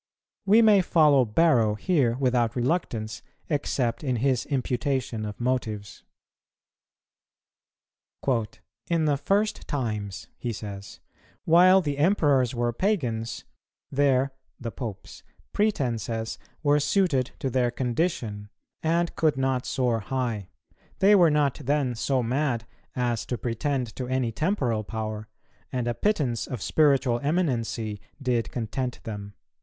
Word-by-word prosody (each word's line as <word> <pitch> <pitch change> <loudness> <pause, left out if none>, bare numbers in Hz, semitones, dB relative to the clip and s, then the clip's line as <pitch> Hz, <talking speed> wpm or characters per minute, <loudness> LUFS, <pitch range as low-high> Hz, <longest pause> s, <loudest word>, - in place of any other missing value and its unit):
We 220 +4 +6
may 210 -3 +6
follow 150 -7 +4
Barrow 115 -3 +3
here 130 - +1
without 125 -3 +1
reluctance, 120 -5 -1 0.3
except 140 -4 -1
in 130 -3 0
his 125 +1 +1
imputation 130 -4 -1
of 105 - -7
motives. 115 -5 -2 2.9
"In 165 -2 +2
the 145 -2 +3
first 200 +8 0
times," 105 - -3
he 120 - -2
says, 100 -2 -8 0.5
"while 180 +3 +6
the 145 -4 -3
Emperors 145 - +3
were 120 0 0
pagans, 120 - -1 0.5
their 135 -1 +2 0.3
[the 115 -2 -5
Popes'] 110 -6 -7 0.3
pretences 115 - -1 0.2
were 145 0 +4
suited 150 -5 +1
to 135 - -3
their 125 -1 +2
condition, 120 - -2 0.3
and 170 +1 0
could 155 -3 +2
not 130 -1 0
soar 125 -4 +1
high; 115 -4 -3 0.5
they 200 +2 +5
were 175 -5 +6
not 150 -1 +1
then 140 -2 +1
so 130 +2 0
mad 125 -1 0 0.3
as 120 -2 0
to 125 - -2
pretend 125 +1 -2
to 125 - -3
any 130 -2 0
temporal 125 - 0
power, 110 0 -5 0.4
and 125 -2 -2
a 120 - +1
pittance 130 - 0
of 125 - -5
spiritual 135 -5 +3
eminency 120 - -1 0.2
did 125 -4 0
content 125 +2 -3
them." 105 -2 -7
125 Hz, 120 wpm, -26 LUFS, 115-150 Hz, 2.9 s, We